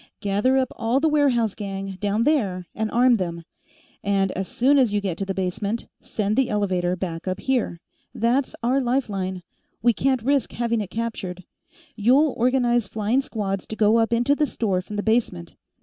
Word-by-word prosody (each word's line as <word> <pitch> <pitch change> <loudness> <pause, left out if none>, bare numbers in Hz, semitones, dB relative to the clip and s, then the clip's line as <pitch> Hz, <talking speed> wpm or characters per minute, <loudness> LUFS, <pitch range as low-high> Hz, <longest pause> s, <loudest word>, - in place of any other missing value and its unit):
Gather 205 +7 +1
up 260 -1 +1
all 235 +3 +1
the 320 - +2
warehouse 265 -8 +2
gang, 195 -2 -6
down 210 +2 0
there, 205 - +1
and 220 0 -2
arm 245 +1 +4
them. 170 -3 -4 0.6
And 195 -1 +1
as 190 0 -3
soon 275 +4 +3
as 250 -5 +3
you 205 - +1
get 195 -4 -2
to 195 - -3
the 195 - -2
basement, 200 +4 -2 0.2
send 210 0 -2
the 265 -2 +2
elevator 185 -4 0
back 170 -2 -5
up 185 +1 -2
here. 245 -8 -1 0.3
That's 245 +4 0
our 255 +3 +2
life 255 0 0
line; 190 -2 -3 0.4
we 240 0 +5
can't 260 0 0
risk 280 +1 +1
having 235 -2 0
it 200 - -5
captured. 195 -5 -4 0.5
You'll 260 +7 +3
organize 240 -2 +2
flying 220 +6 0
squads 200 -7 -3
to 220 - -5
go 215 +1 +4
up 225 0 +1
into 240 +4 +3
the 300 0 +1
store 200 -7 -1
from 210 +3 -8
the 205 - -2
basement. 220 - 0
220 Hz, 185 wpm, -23 LUFS, 195-245 Hz, 0.6 s, we